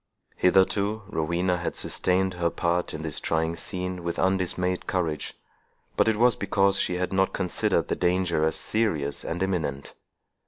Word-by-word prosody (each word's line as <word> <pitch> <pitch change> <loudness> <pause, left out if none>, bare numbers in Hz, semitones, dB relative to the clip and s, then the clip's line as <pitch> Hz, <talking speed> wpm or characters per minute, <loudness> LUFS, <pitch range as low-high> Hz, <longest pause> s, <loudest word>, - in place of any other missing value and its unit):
Hitherto, 100 +3 +2
Rowena 90 +1 0
had 85 - -3
sustained 95 +1 +1
her 85 -1 0
part 85 +1 -1
in 80 - -6
this 80 -3 -3
trying 80 +1 0
scene 90 0 -4
with 85 0 -3
undismayed 90 -1 0
courage, 80 -5 -2 0.6
but - - +3
it 110 -1 +2
was 120 +1 +5
because 100 0 +2
she 90 - 0
had 90 +1 -2
not 95 0 +2
considered 90 -2 0
the - - -1
danger 90 -2 +1
as 80 - +1
serious 80 -11 -1
and 90 +3 -2
imminent. 80 -8 -2
90 Hz, 155 wpm, -26 LUFS, 85-95 Hz, 0.6 s, was